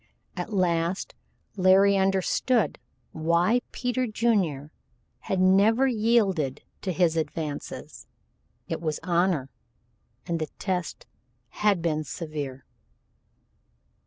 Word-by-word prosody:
At 180 +3 -5
last 175 -2 0 0.4
Larry 195 +1 +5
understood 195 +4 +1 0.3
why 170 +9 +2
Peter 250 0 -1
Junior 195 -11 0 0.6
had 190 - +1
never 200 +7 +4
yielded 210 - +1 0.2
to 190 - -2
his 170 -2 +2
advances. 155 -2 -5 0.6
It - - -4
was 155 -3 -2
honor, 170 -6 +1 0.7
and 170 -2 -2
the 155 - -2
test 180 -3 -3 0.4
had 205 -5 +1
been 155 -2 0
severe. 145 -4 -6
180 Hz, 95 wpm, -26 LUFS, 160-205 Hz, 0.7 s, Larry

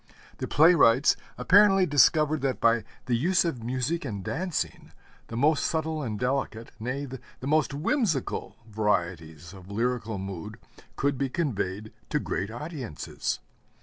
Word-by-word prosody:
The - - -3
playwrights 145 -4 +5 0.2
apparently 195 -1 +5
discovered 150 0 +4
that 135 -1 -1
by 115 -2 +3 0.2
the 125 - +1
use 180 +9 +2
of 135 -8 -2
music 130 +7 -1
and 105 -8 -5
dancing, 180 - -3 0.3
the 115 - -6
most 150 +4 +3
subtle 160 -1 -1
and 110 -6 -3
delicate, 125 -2 -2
nay, 130 +5 -3
the 130 -2 -8 0.2
most 155 0 +2
whimsical 160 - -1
varieties 85 -6 -2
of 95 -1 -13
lyrical 115 0 -1
mood 95 -3 -6 0.4
could 140 -1 0
be 135 -1 0
conveyed 110 - -2 0.2
to - - +1
great 95 +4 -3
audiences. 125 - -5
130 Hz, 135 wpm, -27 LUFS, 110-155 Hz, 0.4 s, playwrights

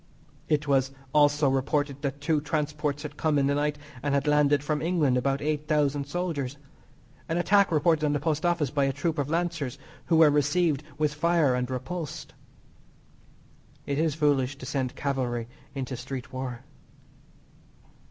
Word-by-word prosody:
It 150 0 +1
was 135 -1 +3 0.2
also 145 0 +4
reported 140 +1 0
that 140 -1 -3
two 150 0 +1
transports 150 -1 -2
had 150 -1 -7
come 155 -2 +1
in 140 - +3
the 140 - +2
night 145 +1 0 0.2
and 140 +1 0
had 140 +1 +1
landed 145 -1 +3
from 150 0 -1
England 160 -6 +2
about 135 +2 0
8,000 150 -2 0
soldiers. 145 -5 -3 0.7
An 165 - 0
attack 195 +2 +4
reported 155 0 +3
on 150 - +2
the 145 - 0
Post 155 0 -1
Office 170 -6 +1
by 140 -2 +2
a 135 - 0
troop 155 +3 -2
of 140 0 -1
lancers 165 -5 -1 0.3
who 170 - +3
were 160 -2 +7
received 150 +1 +2 0.2
with 150 -1 +1
fire 160 -3 +2
and 125 0 -1
repulsed. 135 +5 -5 1.5
It 140 0 -1
is 160 -2 +1
foolish 145 -3 +1
to - - -9
send 130 -3 -2
cavalry 125 -5 -2 0.3
into 130 -1 -3
street 130 +1 -7
war. 130 -2 -5
145 Hz, 160 wpm, -27 LUFS, 135-155 Hz, 1.5 s, were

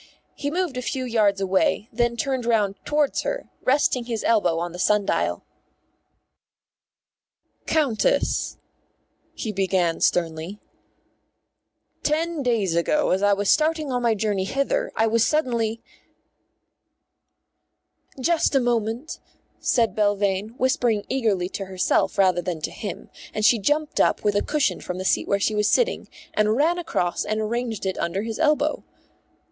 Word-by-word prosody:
He 285 - -3
moved 340 -4 -2
a - - -2
few 260 +1 -3
yards 215 -5 +2
away, 195 +2 +1
and 230 - -16
then 240 0 +1
turned 260 +1 -1
round 210 -4 +2
towards 295 -1 +1
her, - - -4
resting 255 -2 +2
his 230 -2 -3
elbow 190 -8 +2
on 170 +1 -3
the 180 - -9
sundial. 210 +1 +1 2.2
"Countess," 305 - +1 0.8
he 220 - -4
began 190 -4 0
sternly, 170 +3 0 1.4
"ten 320 +1 0
days 220 -9 0
ago, 295 - +1
as 190 - +1
I 205 0 +4
was 200 0 -1
starting 310 -2 +1
on 250 -1 -1
my 235 -2 +2
journey 205 -2 -1
hither, 275 - -1
I 225 - +2
was 225 0 +2
suddenly 235 -7 0 0.8
" - - -52 1.5
"Just 330 +1 +1
a - - +6
moment," 240 +3 -2 0.4
said 230 -6 +1
Belvane, 205 +1 0
whispering 240 -4 +1
eagerly 215 -9 0
to 195 - -5
herself 185 -1 0
rather 185 -2 +3
than 175 -3 -4
to - - -3
him, 210 - -7 0.2
and 215 - 0
she 235 - +5
jumped 295 +8 0
up - - +2
with 205 - +2
a 205 - +3
cushion 300 -3 0
from 180 - -5
the 185 - -5
seat - - +1
where 200 - +1
she 215 - +1
was 210 0 +2
sitting, - - +1 0.3
and 215 +1 +2
ran 325 +7 +2
across 180 - -1
and 215 0 -2
arranged 225 0 -2
it 190 - -2
under 190 +4 -2
his 225 +2 -5
elbow. 305 -1 +1
225 Hz, 150 wpm, -23 LUFS, 195-270 Hz, 2.2 s, a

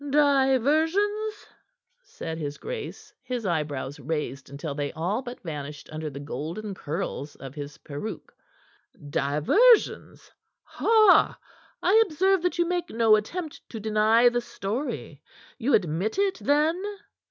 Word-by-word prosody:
"Diversions?" 305 - +2 0.6
said 165 - -7
his 145 -2 -4
grace, 470 -2 -7
his 245 -3 -4
eyebrows 150 -5 -2
raised 140 -2 -4
until 140 +1 -5
they 145 0 -3
all 185 +9 -1
but 245 -1 -8
vanished 150 -3 -7
under 155 0 -4
the 140 -1 -8
golden 160 +9 -5
curls 155 -4 -4
of 135 -1 -9
his 145 -1 -7
peruke. 145 +9 -7 0.8
"Diversions? 155 - +3 0.3
Ha! 435 -4 +4 0.5
I 435 +4 +6
observe 380 +3 +2
that 360 0 -1
you 345 - +3
make 350 -1 -2
no 225 -1 +5
attempt 310 - -4
to 225 - -6
deny 220 +2 +4
the 240 0 +2
story. 235 +3 -5 0.4
You 265 +4 +3
admit 180 - 0
it, 395 -1 +1
then?" 305 +5 +2
220 Hz, 125 wpm, -26 LUFS, -, 0.8 s, I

